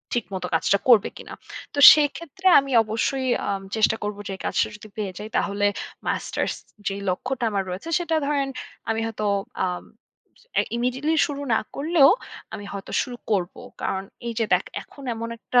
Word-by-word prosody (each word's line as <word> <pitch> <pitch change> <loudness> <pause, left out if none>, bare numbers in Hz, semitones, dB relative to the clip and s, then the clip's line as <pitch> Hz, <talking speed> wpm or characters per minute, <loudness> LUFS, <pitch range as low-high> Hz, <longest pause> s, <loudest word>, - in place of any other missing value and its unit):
ঠিকমতো 190 -6 -3
কাজটা 195 +4 +3
করবে 225 -5 +6
কিনা। - - -9 0.4
তো 290 - -2
সেক্ষেত্রে 315 +4 -1
আমি 275 0 -4
অবশ্যই 245 +5 -1 0.2
আ - - -2 0.3
চেষ্টা 220 0 +3
করব 210 0 -3
যে - - -4
এই - - -15
কাজটা - - +1
যদি 210 +1 -12
পেয়ে 200 -3 -2
যাই 210 +1 -7
তাহলে 205 0 0 0.4
মাস্টার্স - - -1 0.3
যে 195 - -1
লক্ষ্যটা 245 +7 -2
আমার 200 -2 0
রয়েছে 185 - -5
সেটা 335 -2 -1
ধরেন 280 -2 +1 0.4
আমি 225 0 +1
হয়তো 220 -1 -3 0.4
আ - - +3 1.1
ইমিডিয়েটলি 255 +6 0
শুরু 285 -1 -5
না 220 - +4 0.2
করলেও 295 -1 +5 0.4
আমি 205 - -6
হয়তো 195 -1 -7
শুরু 245 -1 -5
করব। 185 -4 +1 0.3
কারণ 190 0 -1 0.2
এই 235 - -2
যে 225 - +2
দেখ - - +3 0.2
এখন 280 - -14
এমন 230 0 -5
একটা 245 +2 +1
230 Hz, 165 wpm, -24 LUFS, 205-275 Hz, 1.1 s, করবে